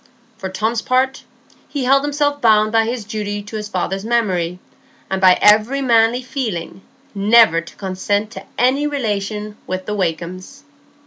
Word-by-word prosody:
For 190 - -6
Tom's 220 +4 -1
part, 260 +1 0 0.4
he 285 -3 -3
held 275 +2 +3
himself 290 0 -1
bound 215 -2 +4
by 225 0 +3
his 230 -1 -4
duty 205 -1 -4
to 210 +2 -9
his 210 -1 -5
father's 190 0 -2
memory, 190 -7 0 0.5
and 190 0 -1
by 185 -1 +6
every 215 +6 +4
manly 235 -1 +3
feeling, 220 - -4 0.3
never 205 -4 +5
to 170 - -14
consent 200 +2 -2
to - - -8 0.2
any 270 +4 +2
relation 210 -6 -3
with 185 0 -4
the 210 - -3
Wakems." 185 - -4
215 Hz, 150 wpm, -18 LUFS, 195-250 Hz, 0.5 s, by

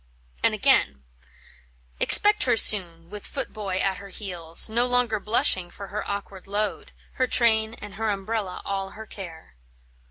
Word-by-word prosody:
And - - +1
again: 65 -1 +1 1.0
"Expect 415 0 +8
her 245 -3 +1
soon, 170 -5 +3
with 210 -1 -8
footboy 195 -3 -6
at 190 0 -2
her 200 +1 -12
heels, 175 -5 -1
No 235 +3 -1
longer 245 -3 0
blushing 195 -4 0
for 200 +2 -11
her 210 - -5
awkward 200 -2 -7
load, 205 +1 -4 0.3
Her 255 - 0
train 220 -2 +1
and 205 -1 -12
her 220 +2 -3
umbrella 200 -1 -5
all 195 -1 -4
her 220 - -9
care." 165 - -12
200 Hz, 150 wpm, -23 LUFS, 185-220 Hz, 1.0 s, Expect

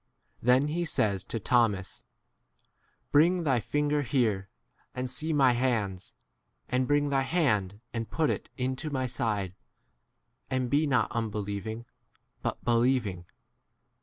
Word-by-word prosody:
Then 130 +4 +4
he 170 +3 -1
says 100 - 0
to 115 - -3
Thomas, 105 -4 +1 1.1
Bring 170 +4 +4
thy 135 -6 +2
fin 145 +6 -1
ger 150 0 +2
here, 110 -8 0 0.5
and 125 0 -2
see 155 +6 -2
my 135 -4 +5
hands; 115 -7 -1 0.5
and 125 0 0
bring 145 0 +2
thy 135 -1 +2
hand 115 - 0
and 115 -1 -3
put 160 -2 +1
it - - -4
into 130 +4 -2
my 130 -3 -1
side; 110 -6 -1 1.0
and 130 -2 -1
be 150 +2 +3
not 125 -5 +2
unbelieving, 110 0 -3 0.6
but - - -1
28 - - -22
believing. 115 -7 +1
125 Hz, 135 wpm, -29 LUFS, 110-145 Hz, 1.1 s, my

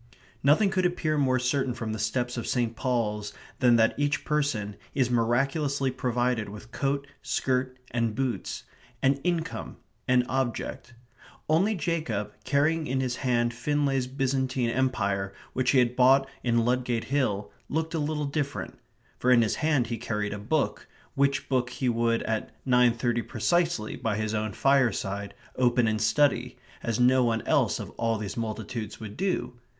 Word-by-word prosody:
Nothing 160 +9 +4
could 185 -1 +1
appear 160 -3 -1
more 130 -3 +2
certain 130 0 0
from 115 -3 -4
the 110 - -4
steps 120 +3 -1
of 120 - -4
St. 120 -2 0
Paul's 105 -4 -1 0.3
than 125 -2 +5
that 115 -1 +4
each 145 0 0
person 140 -10 0 0.2
is 125 -3 +2
miraculously 135 +4 +1
provided 125 -3 0
with 105 +3 -11
coat, 140 +2 -1 0.2
skirt, 130 0 -1
and 115 -2 0
boots; 130 -1 -2 0.4
an 135 +1 +4
income; 170 -2 -2 0.3
an 125 -1 +4
object. 120 -1 -3 0.5
Only 190 +8 +3
Jacob, 155 - -2
carrying 150 +4 +1
in 130 +1 0
his 125 -2 -1
hand 120 -2 +1
Finlay's 135 +1 0
Byzantine 130 -2 0
Empire, 100 -7 0 0.2
which 130 0 +1
he 140 - +4
had 125 -1 +3
bought 135 +2 +5 0.2
in 120 -2 +2
Ludgate 125 -1 0
Hill, 130 -8 -1 0.2
looked 160 +2 -1
a 165 - 0
little 150 0 -1
different; 140 0 -3 0.4
for 125 - +1
in 120 -2 +6
his 110 - 0
hand 150 -5 +2
he 115 -1 -4
carried 105 -3 -2
a 105 - -5
book, 140 +9 -1 0.3
which 140 0 +1
book 125 -2 +1
he 125 +1 -3
would 115 0 +1
at 110 -1 -2 0.2
nine 125 -2 +4
thirty 120 0 0
precisely, 165 0 0
by 115 -4 -2
his 110 0 -2
own 110 -1 -1
fireside, 100 -7 +1 0.2
open 125 -2 +3
and 110 0 0
study, 125 +1 +2 0.2
as 115 0 -2
no 125 +1 +5
one 115 -2 0
else - - +2
of - - -6
all 115 -1 +1
these 105 -2 -5
multitudes 110 -1 -4
would 105 -2 -8
do. 180 -10 -2
125 Hz, 160 wpm, -27 LUFS, 115-140 Hz, 0.5 s, in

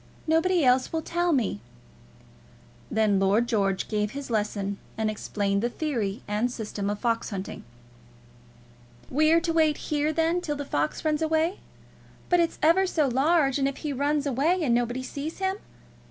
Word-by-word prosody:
Nobody 325 0 +2
else 255 +1 +3
will 320 -1 -2
tell 345 +2 0
me." 225 - 0 1.3
Then 215 -3 +2
Lord 200 +5 +2
George 195 -5 0
gave 210 -1 -1
his 280 -3 -6
lesson, 205 -2 -1 0.2
and 220 -1 0
explained 200 -1 -1
the 240 - 0
theory 235 -9 -3
and 210 +4 0
system 210 -4 -4
of 205 - -2
fox 230 0 -1
hunting. 195 -1 -6 1.5
"We're 310 +4 +4
to 335 -1 -1
wait 315 -2 +3
here, 300 0 -1
then, 330 +2 +1
till 295 -4 -3
the 285 0 -5
fox 150 - -2
runs 305 0 +1
away? 320 +3 +1 0.7
But 355 - +4
it's 335 -1 +1
ever 355 +5 +5
so 310 -5 +1
large, 275 +2 +2
and 275 - +2
if 275 - -4
he 295 - -1
runs 290 +2 0
away, 300 +7 +1
and 250 -6 +2
nobody 245 +2 0
sees 290 +4 -5
him? 380 0 -1
275 Hz, 165 wpm, -26 LUFS, 215-320 Hz, 1.5 s, ever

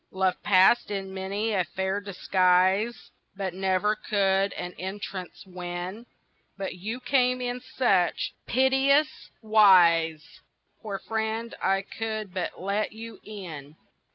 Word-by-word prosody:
"Love 190 -1 0
passed 195 +3 +4
in 195 -2 -4
many 200 +4 -2
a 190 -3 +2
fair 190 +3 -3
disguise 190 +2 +1 0.2
But 190 -2 -3
never 190 +3 +1
could 195 -2 +1
an 180 - -6
entrance 190 -1 -6
win, 180 +4 -6 0.5
But 195 -1 -4
you 215 +7 -5
came 255 -1 +2
in 245 0 -3
such 195 -10 +1
piteous 270 +4 +2
wise, 175 -7 +4 0.4
Poor 205 -3 -4
friend, 220 +2 -3
I 195 0 +1
could 215 -2 -5
but 185 -2 -4
let 200 +4 -2
you 225 +1 -9
in." 160 -9 -9
195 Hz, 120 wpm, -26 LUFS, 185-220 Hz, 0.5 s, passed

